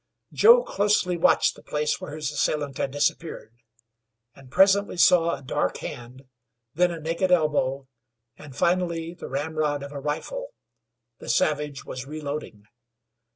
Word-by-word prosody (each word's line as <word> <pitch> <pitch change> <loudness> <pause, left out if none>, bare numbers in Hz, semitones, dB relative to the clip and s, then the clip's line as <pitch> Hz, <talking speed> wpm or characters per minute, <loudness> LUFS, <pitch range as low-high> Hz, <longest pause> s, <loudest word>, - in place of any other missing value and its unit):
Joe 475 +3 +7
closely 200 - +1
watched 170 - +3
the - - -15
place 150 0 -2
where 145 - -7
his 150 -2 -3
assailant 145 -1 -1
had - - 0
disappeared, 145 -3 -2 0.8
and 135 0 -16
presently 195 +6 +3
saw 170 -2 +4
a 135 - -13
dark 90 -7 -1
hand, 125 +2 -9 0.5
then 175 +3 +3
a 170 -1 -5
naked 165 +4 -1
elbow, 145 -5 +1 0.5
and 145 -4 -13
finally 170 -2 0
the - - -9
ramrod 145 +1 -2
of 140 - -8
a 145 - -6
rifle. - - -5 0.6
The - - -9
savage 145 +2 0
was 130 +1 -7
reloading. 145 -8 -6
150 Hz, 140 wpm, -25 LUFS, 140-175 Hz, 0.8 s, Joe